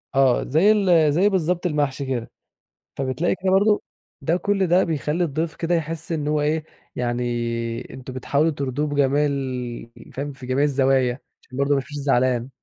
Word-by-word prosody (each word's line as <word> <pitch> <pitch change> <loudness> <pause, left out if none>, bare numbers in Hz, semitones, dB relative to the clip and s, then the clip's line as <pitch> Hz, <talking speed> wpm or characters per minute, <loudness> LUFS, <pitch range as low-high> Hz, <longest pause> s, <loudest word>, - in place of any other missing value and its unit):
آه 135 -2 +4
زي 165 +10 +4
ال 175 -8 +4
زي 195 +6 +4
بالضبط 180 -1 0
المحشي 145 -4 0
كده، 125 -3 -3 0.6
فبتلاقي 135 +5 -1
كده 185 - +2
برضو 205 +2 +3 0.4
ده 165 +5 +1
كُلّ 195 0 0
ده 180 +3 +4
بيخَلّي 160 +1 -1
الضيف 160 +1 -2
كده 170 +1 0
يحس 165 0 -3
إن 150 -3 -1
هو 150 0 +1
إيه 155 +1 0 0.3
يعني 120 0 -1 0.7
أنتم 130 0 -8
بتحاولوا 140 +5 +1
ترضوه 140 +1 -2
بجميع 145 0 +2
ال 130 -4 -3 0.2
فاهم؟ 145 +2 -4
في 130 -1 -11
جميع 130 +3 +1
الزوايا 135 -3 +2 0.2
عشان 130 - -11
برضو 140 +1 +1
ما - - +5
يمشيش 140 +2 -4
زعلان. 130 -3 +1
145 Hz, 165 wpm, -23 LUFS, 130-165 Hz, 0.7 s, ما